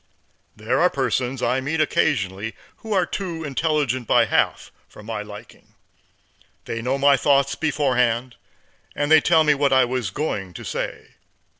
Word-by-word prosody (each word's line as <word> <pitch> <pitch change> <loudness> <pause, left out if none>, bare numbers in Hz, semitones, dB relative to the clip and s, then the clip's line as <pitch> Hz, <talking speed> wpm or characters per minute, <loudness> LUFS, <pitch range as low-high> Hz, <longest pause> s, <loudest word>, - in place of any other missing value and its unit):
There - - -1
are - - +5
persons 125 0 -2
I 125 +2 +1
meet 150 +5 -2
occasionally 110 -9 0 0.2
who 220 - -10
are 190 -3 +2
too 170 -2 -5
intelligent 140 -4 -1
by - - +4
half - - 0 0.2
for 105 - -14
my 110 -1 -4
liking. 105 +2 -13 0.9
They 115 - -4
know 130 +4 -1
my 140 0 +5
thoughts 140 +1 +2
beforehand, 125 -5 0 0.6
and 145 +1 -1
tell 160 -2 +4
me 150 -1 +4
what 140 -1 +1
I 130 -1 +5
was 125 -5 -2
going 95 - -4
to - - -8
say. - - -5
130 Hz, 150 wpm, -22 LUFS, 115-150 Hz, 0.9 s, are